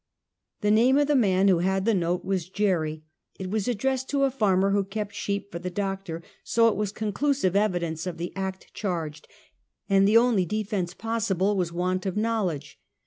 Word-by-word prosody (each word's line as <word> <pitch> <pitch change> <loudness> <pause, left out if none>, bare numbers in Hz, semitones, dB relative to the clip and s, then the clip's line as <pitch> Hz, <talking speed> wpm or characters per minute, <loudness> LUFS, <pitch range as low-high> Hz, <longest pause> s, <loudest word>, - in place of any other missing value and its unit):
The 210 - +2
name 240 +5 +5
of 290 - +4
the 295 - +3
man 195 -6 +3
who 185 -3 +4
had 190 +2 0
the 230 - +3
note 175 -1 0
was 185 -3 -2
Jerry, 165 -7 0 0.3
It 190 -1 -5
was 215 0 -1
addressed 260 +3 -1
to 280 -1 +1
a 270 - +3
farmer 195 -6 +2
who 200 0 +2
kept 205 +1 -5
sheep 200 0 -3
for 170 - -5
the 180 +1 -4
doctor, 195 -3 -4 0.2
so 230 0 +3
it - - -1
was 210 -1 -1
conclusive 215 0 0
evidence 175 -5 0
of 175 -2 -4
the 175 +1 -5
act 190 -1 -5
charged, 165 -7 -4 0.6
and 195 -1 +4
the 215 +2 +6
only 230 -5 +4
defense 195 -2 -2
possible 210 -3 0
was 180 -3 -1
want 185 +2 -1
of 190 - -2
knowledge. 210 -9 -1
195 Hz, 190 wpm, -26 LUFS, 180-215 Hz, 0.6 s, the